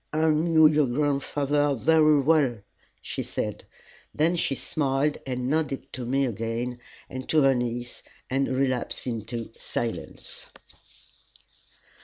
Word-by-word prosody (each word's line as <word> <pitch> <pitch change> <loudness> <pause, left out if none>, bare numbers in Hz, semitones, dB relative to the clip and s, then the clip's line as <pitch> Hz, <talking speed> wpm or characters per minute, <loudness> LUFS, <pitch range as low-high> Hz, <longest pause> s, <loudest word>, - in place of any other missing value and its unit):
"I 155 +1 +3
knew 160 +1 +4
your 150 -2 +5
grandfather 145 +1 +1
very 155 +2 +4
well," 140 -5 +3 0.5
she - - -4
said. - - -4 0.5
Then 165 +3 +2
she 160 -5 +1
smiled 140 +1 0
and 125 -1 -2
nodded 140 -2 -1
to 125 -2 -5
me 135 +2 +2
again, 115 +2 -3 0.3
and 130 0 -7
to 155 -2 +4
her 135 0 +5
niece, 120 -1 -3 0.3
and 135 +1 0
relapsed 130 -1 -1
into 115 -1 -4
silence. 120 -1 -4
135 Hz, 120 wpm, -26 LUFS, 125-150 Hz, 0.5 s, your